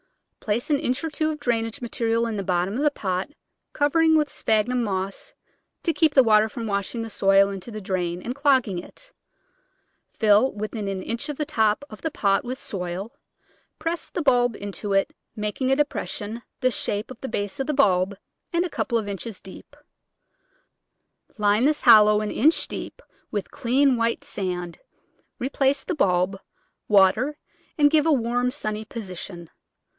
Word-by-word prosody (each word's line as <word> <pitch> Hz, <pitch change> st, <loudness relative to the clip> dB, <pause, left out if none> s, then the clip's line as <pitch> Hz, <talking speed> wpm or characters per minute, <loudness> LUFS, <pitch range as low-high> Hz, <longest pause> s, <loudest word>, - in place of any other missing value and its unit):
Place 230 Hz, +7 st, -2 dB
an 285 Hz, -, +3 dB
inch 255 Hz, +3 st, -1 dB
or 325 Hz, -, -1 dB
two 310 Hz, +1 st, 0 dB
of 305 Hz, -1 st, -4 dB
drainage 230 Hz, -1 st, -1 dB
material 230 Hz, -1 st, 0 dB
in 225 Hz, -2 st, -3 dB
the 200 Hz, -, -3 dB
bottom 180 Hz, +1 st, 0 dB
of 255 Hz, -, -2 dB
the 300 Hz, -, +4 dB
pot, 190 Hz, -7 st, -3 dB, 0.4 s
covering 320 Hz, +2 st, +3 dB
with 300 Hz, -2 st, +1 dB
sphagnum 230 Hz, +3 st, +1 dB
moss 195 Hz, -2 st, -4 dB, 0.5 s
to 330 Hz, -, +1 dB
keep 315 Hz, -3 st, +2 dB
the 265 Hz, -, +8 dB
water 215 Hz, -1 st, +4 dB
from 230 Hz, +2 st, -6 dB
washing 205 Hz, +3 st, -2 dB
the 225 Hz, -, -7 dB
soil 195 Hz, 0 st, +4 dB
into 195 Hz, +3 st, -7 dB
the 215 Hz, -2 st, -6 dB
drain 180 Hz, -3 st, -2 dB
and 245 Hz, -, -3 dB
clogging 260 Hz, -9 st, +2 dB
it; -, -, -11 dB, 1.0 s
fill 215 Hz, +4 st, +3 dB
within 210 Hz, 0 st, -4 dB
an 190 Hz, -1 st, -3 dB
inch 235 Hz, +6 st, -3 dB
of 295 Hz, -, -4 dB
the 300 Hz, -, -1 dB
top 220 Hz, -3 st, +1 dB
of 215 Hz, -, -10 dB
the 320 Hz, -, -1 dB
pot 200 Hz, -9 st, +1 dB
with 255 Hz, +2 st, -4 dB
soil; 185 Hz, -1 st, -4 dB, 0.7 s
press 330 Hz, +2 st, -3 dB
the 345 Hz, -, -3 dB
bulb 245 Hz, -4 st, +3 dB
into 205 Hz, 0 st, -4 dB
it, 195 Hz, 0 st, +1 dB, 0.2 s
making 210 Hz, +5 st, -2 dB
a -, -, +5 dB
depression 220 Hz, -5 st, -3 dB, 0.2 s
the 255 Hz, 0 st, +3 dB
shape 210 Hz, 0 st, -3 dB
of 255 Hz, -, -11 dB
the 265 Hz, -, -5 dB
base 205 Hz, 0 st, -3 dB
of 270 Hz, -, -2 dB
the 300 Hz, -, 0 dB
bulb 195 Hz, -6 st, +2 dB, 0.3 s
and 345 Hz, 0 st, +1 dB
a -, -, -3 dB
couple 235 Hz, -6 st, -1 dB
of 215 Hz, -2 st, -3 dB
inches 200 Hz, +1 st, -6 dB
deep; 190 Hz, -, -13 dB, 1.6 s
line 210 Hz, +3 st, +3 dB
this 300 Hz, +1 st, +1 dB
hollow 210 Hz, -3 st, +7 dB
an 210 Hz, -, -3 dB
inch 315 Hz, +3 st, +3 dB
deep -, -, -7 dB, 0.3 s
with 205 Hz, -2 st, -4 dB
clean 260 Hz, +2 st, +2 dB
white 230 Hz, 0 st, 0 dB
sand, 180 Hz, -3 st, -4 dB, 0.6 s
replace 270 Hz, +2 st, 0 dB
the -, -, -3 dB
bulb, 185 Hz, -5 st, +1 dB, 0.5 s
water, 215 Hz, +8 st, +4 dB, 0.4 s
and 290 Hz, -1 st, +5 dB
give 310 Hz, 0 st, +3 dB
a -, -, +4 dB
warm, 245 Hz, -2 st, +1 dB
sunny 215 Hz, -5 st, -3 dB
position. 185 Hz, -5 st, -8 dB
225 Hz, 170 wpm, -24 LUFS, 200-270 Hz, 1.6 s, the